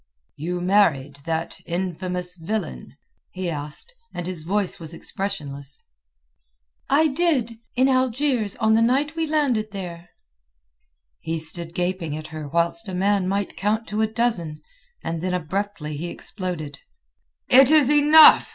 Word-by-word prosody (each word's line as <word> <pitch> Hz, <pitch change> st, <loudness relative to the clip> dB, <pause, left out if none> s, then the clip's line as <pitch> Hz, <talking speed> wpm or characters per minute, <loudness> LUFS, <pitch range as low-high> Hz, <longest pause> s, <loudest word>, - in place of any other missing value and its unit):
"You 175 Hz, +4 st, -3 dB
married 165 Hz, -8 st, +2 dB
that 165 Hz, 0 st, -2 dB
infamous 180 Hz, 0 st, -3 dB
villain?" 175 Hz, -, -5 dB, 0.3 s
he 185 Hz, -2 st, -4 dB
asked, 150 Hz, -, -7 dB, 0.2 s
and 175 Hz, -, -4 dB
his 180 Hz, -3 st, -4 dB
voice 195 Hz, +3 st, -1 dB
was 165 Hz, 0 st, -8 dB
expressionless. 145 Hz, -8 st, -5 dB, 1.1 s
"I 295 Hz, +4 st, +4 dB
did—in 260 Hz, -5 st, 0 dB
Algiers 255 Hz, -4 st, +1 dB
on 220 Hz, 0 st, +2 dB
the 225 Hz, -, +4 dB
night 275 Hz, +6 st, +2 dB
we 325 Hz, -1 st, -1 dB
landed 280 Hz, -8 st, +1 dB
there." 175 Hz, -3 st, -7 dB, 1.1 s
He 165 Hz, 0 st, -3 dB
stood 165 Hz, +1 st, -3 dB
gaping 175 Hz, -4 st, -2 dB
at 155 Hz, -, -7 dB
her 155 Hz, -2 st, -6 dB
whilst 170 Hz, +7 st, 0 dB
a 185 Hz, -, -4 dB
man 195 Hz, 0 st, +1 dB
might 200 Hz, +1 st, -2 dB
count 215 Hz, +3 st, 0 dB
to 210 Hz, +1 st, -1 dB
a 220 Hz, -, +3 dB
dozen, 215 Hz, -9 st, -2 dB, 0.4 s
and 165 Hz, -1 st, -3 dB
then 180 Hz, 0 st, -1 dB
abruptly 175 Hz, -2 st, -3 dB
he 170 Hz, +4 st, -4 dB
exploded. 170 Hz, -6 st, -5 dB, 0.7 s
"It 265 Hz, +1 st, +7 dB
is 295 Hz, -3 st, +5 dB
enough!" 300 Hz, +1 st, +8 dB
185 Hz, 135 wpm, -23 LUFS, 165-230 Hz, 1.1 s, enough